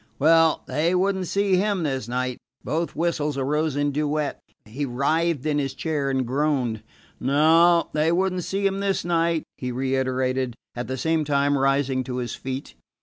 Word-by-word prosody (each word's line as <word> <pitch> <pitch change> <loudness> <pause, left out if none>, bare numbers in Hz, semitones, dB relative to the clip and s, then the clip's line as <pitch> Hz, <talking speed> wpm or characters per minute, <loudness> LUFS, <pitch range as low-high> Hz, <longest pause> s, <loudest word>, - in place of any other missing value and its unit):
Well, 160 +2 +4
they 165 +4 0
would 195 +2 +2
n't 185 -1 -3
see 200 0 +2
him 200 -2 0
this 135 -6 -2
night. 125 +1 -2 0.2
Both 165 +2 -2
whistles 150 -3 -1
arose 150 +2 0
in 145 0 +1
duet. 150 0 -1 0.3
He 120 +7 -5
writhed 145 +3 0
in 150 -1 +1
his 135 -1 -3
chair 150 -3 -1
and 130 -1 0
groaned. 130 -4 0 0.4
No, 165 +5 +4
they 155 +2 +2
would 185 +2 +1
n't 180 -1 -3
see 195 +3 -2
him 195 0 +1
this 195 -3 -1
night, 165 -1 +1 0.2
he 125 -1 -3
reiterated, 130 -1 -1 0.2
at 120 0 -5
the 130 - -3
same 160 +3 +1
time 145 -1 +1
rising 135 -1 +1
to 125 - -4
his 120 -2 -3
feet. 130 +1 -6
145 Hz, 175 wpm, -24 LUFS, 130-165 Hz, 0.4 s, Well